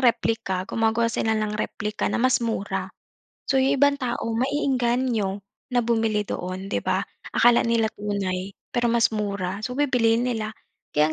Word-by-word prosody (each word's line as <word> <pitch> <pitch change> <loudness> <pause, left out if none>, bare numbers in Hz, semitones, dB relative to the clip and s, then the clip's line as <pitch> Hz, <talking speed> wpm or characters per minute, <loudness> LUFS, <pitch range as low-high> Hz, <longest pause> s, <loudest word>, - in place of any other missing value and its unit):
replika, 225 -6 +1
gumagawa 225 +2 +1
sila 220 0 +1
ng 215 -1 -1
replika 210 -1 -2
na - - -1
mas 255 +1 +3
mura. 220 -3 -2 0.6
So, 265 -1 +2
'yong 270 +1 +2
ibang 285 +1 +4
tao 240 -2 -2
maeengganyo 245 -5 +1 0.3
na 245 -1 +2
bumili 225 -3 +1
doon, 185 0 -4
'di 195 - -2
ba? - - 0 0.2
Akala 240 0 +5
nila 230 -1 +2
tunay, 195 -2 -3 0.2
pero 240 -1 +2
mas 230 -1 +3
mura. 200 -2 -2
So 250 +4 -4
bibilihin 245 -4 +3
nila, 220 -3 -1 0.4
kaya 150 +1 +3
225 Hz, 150 wpm, -24 LUFS, 205-245 Hz, 0.6 s, Akala